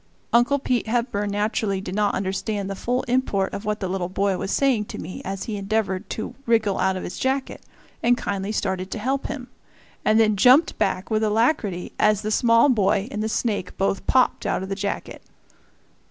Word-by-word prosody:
Uncle 240 +4 +4
Pete 250 -4 -1
Hepburn 225 -3 -1
naturally 205 -1 0
did 190 -1 -6
not 205 0 +1
understand 195 +1 -2
the 195 - -4
full 250 +6 -1
import 240 -6 0
of 200 - -5
what 210 0 -2
the 190 - -1
little 180 -1 -2
boy 195 +1 0
was 195 - -4
saying 250 -3 +2
to - - -8
me 185 - -7
as 195 0 -4
he 215 -2 -4
endeavored 200 -1 -1
to 220 - -4
wriggle 220 -4 +2
out 190 0 +1
of - - -5
his - - -6
jacket, 265 +1 -1 0.4
and 240 +1 +3
kindly 200 -2 -3
started 190 -3 -2
to - - -4
help 265 +5 -1
him 260 -4 -6 0.6
and 215 +1 +4
then 215 -1 +4
jumped 255 - +5
back 185 +4 -1
with 215 0 +2
alacrity 215 - +1
as 210 -1 +3
the 215 - -2
small 230 +2 +4
boy 205 -3 +2
and 210 - -3
the 220 - -1
snake 215 -5 -2
both 195 0 -1
popped 255 -1 +3
out - - 0
of 190 - -6
the - - -1
jacket. 200 +1 -4
210 Hz, 195 wpm, -23 LUFS, 195-235 Hz, 0.6 s, jumped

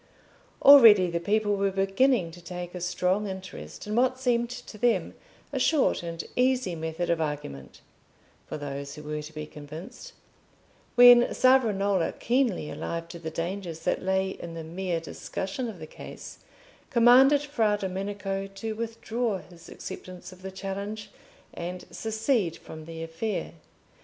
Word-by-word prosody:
Already 220 -10 +9
the 170 - -1
people 205 +3 +1
were 200 0 +1
beginning 195 +1 +2
to 175 +1 -12
take 175 0 -7
a 180 - -6
strong 180 +3 0
interest 185 - -8
in 210 +1 -3
what 255 +1 +2
seemed 240 -2 +1
to 245 -3 -9
them 240 +1 +1 0.4
a - - 0
short 310 -4 +2
and 170 -1 -5
easy 250 -6 +2
method 160 +1 -2
of 165 -1 +1
argument 145 - -5 0.7
(for - - -5
those 140 -1 -6
who 150 - -10
were 150 0 -4
to 150 +1 -9
be 155 -1 -6
convinced), 155 - -10 0.8
when 245 0 +8
Savonarola, 205 -8 +3
keenly 240 - 0
alive 165 0 -4
to 170 - -8
the 160 -1 -5
dangers 170 0 -4
that - - 0
lay 190 0 +1
in 170 -2 -8
the 165 - -6
mere 175 +1 -3
discussion 195 +8 -5
of 220 -5 -7
the 160 - -8
case, - - -10 0.5
commanded 260 +4 +6
Fra 225 -8 +1
Domenico 195 0 -3
to 215 +3 -5
withdraw 230 0 -2
his 175 -2 -14
acceptance 185 0 -9
of 185 - -17
the 190 - -6
challenge 200 +2 -5 0.4
and 180 +1 -6
secede 220 - 0
from 155 -1 -10
the 165 0 -7
affair. 165 +7 -3
190 Hz, 150 wpm, -27 LUFS, 170-225 Hz, 0.8 s, Already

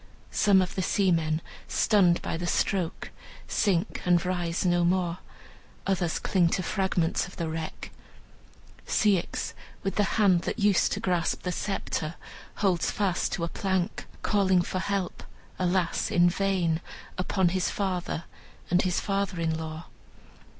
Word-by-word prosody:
Some 200 -3 +4
of 180 - -5
the 190 - -1
seamen, 165 -4 +1 0.3
stunned 185 -6 +3
by - - -2
the 175 +1 -3
stroke, 175 -1 -1 0.4
sink, 185 -5 0
and 175 -1 +3
rise 175 -1 -1
no 175 -1 +3
more; 175 0 +1 0.7
others 180 -4 0
cling 175 -3 +2
to 185 - -2
fragments 180 -2 0
of 190 - -13
the 170 - -3
wreck. 160 0 -5 1.0
Ceyx, 200 -5 +1 0.3
with 195 - -2
the 205 - +4
hand 190 -5 +5
that - - -3
used 205 -4 +3
to - - -2
grasp 175 -2 0
the 180 - -1
sceptre, 170 -4 -3 0.4
holds 185 -5 +1
fast 195 -4 0
to 170 - -2
a - - +1
plank, 190 0 -2 0.2
calling 190 -4 +3
for 185 - -3
help, 195 -1 -2 0.4
alas, 180 -1 +1
in 175 0 +4
vain, 180 -4 +1 0.4
upon 185 0 +2
his 185 +1 0
father 180 -4 -2 0.5
and 180 +1 +4
his 180 -2 0
father 195 -2 -1
in 160 -1 0
law. 160 +1 -6
180 Hz, 145 wpm, -27 LUFS, 170-195 Hz, 1.0 s, hand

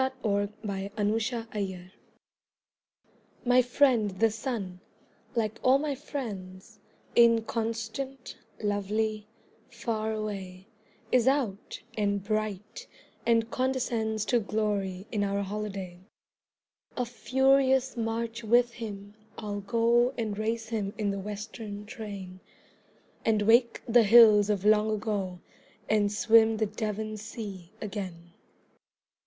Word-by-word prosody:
A 260 - 0
WESTERN 205 0 -1 0.3
VOYAGE 190 -3 -4 1.5
My 250 +1 +6
friend 245 -3 +3
the 215 +4 +1
Sun 215 -6 -4 0.6
like 220 -2 -1
all 260 +1 +5
my 290 0 -2
friends 205 -10 -7 0.4
Inconstant, 230 +2 +1 0.3
lovely, 210 +1 -1 0.4
far 225 -2 -2
away 195 -4 -5 0.5
Is 250 -1 +4
out, 255 -8 0 0.2
and 200 -2 0
bright, 215 -1 -3 0.4
and 230 0 +3
condescends 235 -4 -1
To 240 - +3
glory 205 -3 -2
in 205 -2 0
our 200 0 0
holiday. 195 -3 -5 1.0
A 250 - 0
furious 265 +2 +2
march 230 0 -3
with 240 +2 +3
him 205 -3 -7 0.2
I'll 205 -2 -4
go 235 +4 +2
And 220 -3 -2
race 225 +1 -2
him 210 -3 -2
in 205 -2 0
the 200 - -3
Western 210 +1 -6
train, 200 -4 -8 0.8
And 215 -2 +2
wake 235 +2 +4
the 240 +1 +6
hills 215 -2 +7
of 205 -2 0
long 215 0 +4
ago 195 -4 -3 0.5
And 210 -1 +2
swim 225 +1 +4
the 220 - +1
Devon 215 0 -4
sea 205 -4 -8
again. 185 -5 -6
215 Hz, 110 wpm, -28 LUFS, 200-230 Hz, 1.5 s, hills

